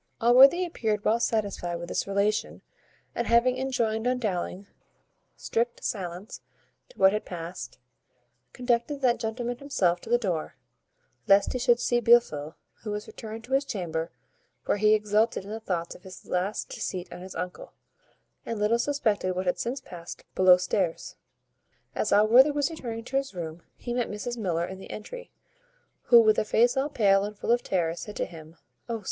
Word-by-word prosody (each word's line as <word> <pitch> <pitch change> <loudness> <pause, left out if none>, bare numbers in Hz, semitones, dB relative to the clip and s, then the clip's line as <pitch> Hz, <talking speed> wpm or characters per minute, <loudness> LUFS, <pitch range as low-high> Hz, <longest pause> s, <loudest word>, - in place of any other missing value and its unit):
Allworthy 265 +9 +6
appeared 220 - -2
well 225 +2 +3
satisfied 205 -7 -1
with 170 0 -6
this - - -2
relation, 200 +2 -1 0.5
and, 235 - -2
having 240 +2 +3
enjoined 235 -4 -1
on 250 0 +1
Dowling 195 -3 -3 0.7
strict 235 +1 -2
silence 185 0 -5
as - - -41
to - - -32
what 190 +1 +5
had 215 - -1
past, 175 0 -7 0.7
conducted 245 +3 -1
that 245 -2 +2
gentleman 240 +2 -3
himself 180 -11 0
to - - -11
the 240 - +4
door, 180 -9 -3 0.7
lest 195 0 +4
he 255 - -2
should 240 -1 +3
see 240 0 +1
Blifil, 180 -10 +3 0.3
who 220 - -6
was 210 0 -4
returned 225 0 -9
to 250 +4 -7
his 270 +1 +3
chamber, 175 - -3 0.6
where - - +1
he 215 +1 +5
exulted 210 0 +1
in 200 - -9
the 220 - -4
thoughts 175 -6 -3
of - - -15
his 185 -1 -12
last 185 +4 -2
deceit 180 -1 -5
on - - -9
his 185 0 -9
uncle, 180 0 -6 0.7
and 230 - -4
little 210 +3 +2
suspected 220 -9 0
what 185 +1 -2
had 180 - 0
since 255 +3 -3
passed 175 -6 -10
below 185 -1 +6
stairs. 180 -1 -2 0.8
As 210 - -1
Allworthy 230 +7 +6
was 290 +2 0
returning 230 -7 -6
to 270 +3 -2
his 275 -6 -3
room 165 -1 -6 0.2
he 240 - -5
met 245 -1 -1
Mrs 225 +4 -4
Miller 175 -7 -1
in 190 +1 -8
the - - -11
entry, - - -8 0.8
who, 240 -1 +8
with 215 -2 +4
a - - +1
face 235 +3 +3
all 270 +2 0
pale 200 -7 +3
and 210 0 -6
full 230 - -1
of 240 0 +3
terror, 170 -4 0
said 210 +4 -8
to - - -1
him, 160 -1 -12 0.3
"O! 230 -1 -2
215 Hz, 180 wpm, -27 LUFS, 185-240 Hz, 0.8 s, who